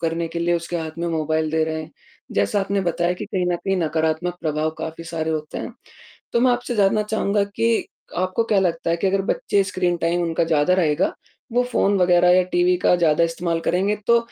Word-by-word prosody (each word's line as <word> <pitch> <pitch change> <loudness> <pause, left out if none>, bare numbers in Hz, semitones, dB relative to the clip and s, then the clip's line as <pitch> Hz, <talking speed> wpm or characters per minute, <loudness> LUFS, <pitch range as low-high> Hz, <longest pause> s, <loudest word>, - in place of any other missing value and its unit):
करने 165 0 -1
के 170 - -5
लिए 170 +1 +1
उसके 170 +1 -4
हाथ 160 -1 -4
में 170 - -2
मोबाइल 155 -1 -1
दे 160 0 +1
रहे 160 0 -3
हैं। 155 - -12 0.4
जैसा 100 - +1
आपने 195 +1 -1
बताया 175 -1 0
कि 180 - -6
कहीं 185 -2 -1
न - - 0
कहीं 195 +2 -1
नकारात्मक 160 +1 0
प्रभाव 155 -1 -1
काफ़ी 160 +1 -6
सारे 160 -1 -3
होते 155 -1 -4
हैं, - - -6 0.6
तो 235 - +2
मैं 255 +1 +4
आपसे 245 0 -2
जानना 205 +1 +3
चाहूँगा 210 -1 0
कि, 225 +3 0 0.3
आपको 185 +5 0
क्या 210 -3 +2
लगता 170 -2 0
है 170 - +2
कि 170 - -1
अगर 195 0 +1
बच्चे 200 - +1
स्क्रीन 180 -2 0
टाइम 170 +1 0
उनका 165 -1 0
ज़्यादा 160 +2 +2
रहेगा, 165 -2 +1 0.4
वो 245 +1 +3
फोन 200 +1 +2
वग़ैरह 180 -1 +4
या 185 +1 +5
टीवी 175 +1 +3
का - - +5
ज़्यादा 165 -1 +3
इस्तेमाल 165 0 -2
करेंगे 195 +5 0
तो, 235 0 +5
175 Hz, 215 wpm, -22 LUFS, 160-195 Hz, 0.6 s, या